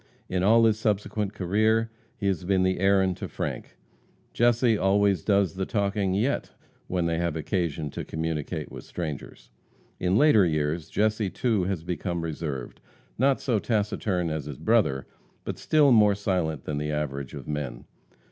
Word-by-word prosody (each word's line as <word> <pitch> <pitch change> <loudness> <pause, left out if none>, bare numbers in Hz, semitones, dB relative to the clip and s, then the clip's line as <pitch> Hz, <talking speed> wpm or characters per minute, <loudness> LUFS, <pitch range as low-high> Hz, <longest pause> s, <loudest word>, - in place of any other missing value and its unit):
In 90 -1 -1
all 115 +4 +5
his 110 -1 +2
subsequent 105 -1 -1
career 110 +4 +1 0.3
he - - -5
has 95 -2 0
been 95 0 +2
the 95 0 +1
Aaron 95 -1 +3
to - - -6
Frank. - - -5 0.6
Jesse 120 -1 +3
always 100 -1 +2
does 100 -5 +2
the 95 0 -2
talking 100 -2 0
yet, 120 +8 0 0.4
when 90 -2 -1
they 85 0 0
have 85 -2 -1
occasion 80 -2 -2
to - - -5
communicate 80 -1 -4
with - - -8
strangers. 70 -7 -7 0.5
In 90 +2 +2
later 130 -7 +6
years 75 -1 -1
Jesse, 110 -1 +1
too, 110 -3 0
has 95 -4 -2
become 85 0 -3
reserved, 75 -5 -5 0.4
not 135 +1 +3
so 120 -5 +1
taciturn 100 -5 -1
as 80 -3 -3
his 75 -3 -7
brother, 65 0 +2 0.4
but - - -5
still 150 -3 +4
more 105 -3 +5
silent 90 -8 -1
than 75 -1 -3
the 75 0 -2
average 70 -3 -3
of - - -9
men. 75 -5 -4
95 Hz, 160 wpm, -26 LUFS, 80-105 Hz, 0.6 s, later